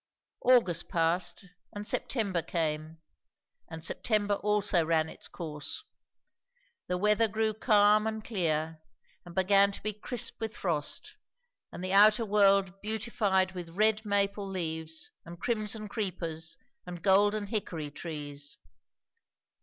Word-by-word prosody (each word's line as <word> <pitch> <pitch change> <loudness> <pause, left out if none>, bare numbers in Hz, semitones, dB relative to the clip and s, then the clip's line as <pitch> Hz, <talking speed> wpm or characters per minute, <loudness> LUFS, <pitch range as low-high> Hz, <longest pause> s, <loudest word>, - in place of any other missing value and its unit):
August 225 -10 +4
passed, 170 +4 +1 0.3
and 205 0 -6
September 205 -6 0
came. 160 -1 -2 0.7
And 160 0 -6
September 210 -3 +1
also 205 -4 +2
ran 160 -1 +1
its - - -6
course. 150 - -5 1.0
The 180 - -1
weather 210 +4 +3
grew 220 +1 0
calm 210 -1 +4
and 220 -1 -4
clear, 160 -6 -1 0.5
and 170 - -11
began 195 +1 +4
to - - -9
be 215 +1 -1
crisp 235 +3 -3
with 220 -1 -4
frost, 160 -6 -1 0.5
and 180 - -8
the 185 +1 -2
outer 215 +3 +6
world 195 -2 +3
beautified 210 -3 0
with 175 -1 -8
red 215 0 +3
maple 200 -1 0
leaves 160 -4 -4
and 170 0 -11
crimson 215 -2 -2
creepers 170 -6 -4 0.3
and 175 -1 -8
golden 205 +2 +3
hickory 175 -8 -4
trees. 145 -2 -7
195 Hz, 120 wpm, -30 LUFS, 165-210 Hz, 1.0 s, outer